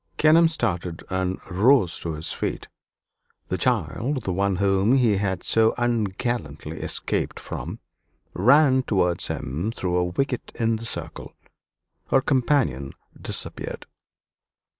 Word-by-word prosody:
Kenelm 160 +2 +6
started 90 - -2
and 95 0 -1
rose 105 -1 +3
to 80 - -4
his 80 +1 -4
feet. - - -3 0.8
The - - -1
child, 130 +1 0
the 95 - -2
one 100 +1 +1
whom 100 +5 +3
he 115 -6 +3
had 95 -2 -2
so 110 0 +3
ungallantly 115 - -2
escaped - - -2
from, - - -6 0.6
ran 130 +6 +5
towards 90 -8 0
him 80 - -3
through 90 -5 -2
a 90 - +2
wicket 125 +8 -2
in 115 -1 +1
the 115 +1 -7
circle. 80 -7 -7 0.7
Her 135 - +4
companion 130 - +1 0.3
disappeared. - - -4
100 Hz, 120 wpm, -24 LUFS, 90-125 Hz, 0.8 s, Kenelm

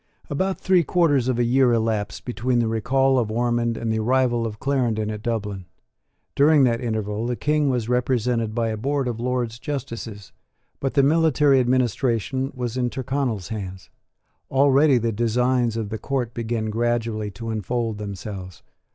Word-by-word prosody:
About 190 +6 -1
three 185 -2 +3
quarters 145 -6 +2
of 130 -2 +1
a 120 - +2
year 125 +1 +3
elapsed 110 -3 -1
between 125 0 -1
the 120 -1 +2
recall 130 +4 +2
of 115 -3 -1
Ormond 120 0 0
and 115 -1 -1
the 110 - 0
arrival 120 0 +1
of 105 -1 -8
Clarendon 120 -6 0
at 105 -1 -6
Dublin. 105 -5 -3 0.7
During 145 0 +5
that 120 -2 +2
interval 110 -1 -2
the 125 - -1
King 150 +2 +1
was 120 -4 -1
represented 125 -2 0
by 115 -1 0
a 110 - -3
board 135 +3 -1
of 115 -2 -3
Lords 120 -1 -2
Justices: 115 -8 -6 0.5
but 135 +1 -2
the 140 - +5
military 150 -2 +4
administration 130 +1 0
was 125 -1 -3
in 125 -1 +1
Tyrconnel's 130 -6 -2
hands. 95 -4 -7 0.6
Already 140 +1 +4
the 115 -1 0
designs 120 +1 +1
of 110 -3 -3
the 110 0 -4
court 125 -1 -2
began 110 -2 -2
gradually 115 -2 -1
to 115 +4 -6
unfold 110 0 -2
themselves. 100 -2 -7
120 Hz, 160 wpm, -23 LUFS, 110-130 Hz, 0.7 s, During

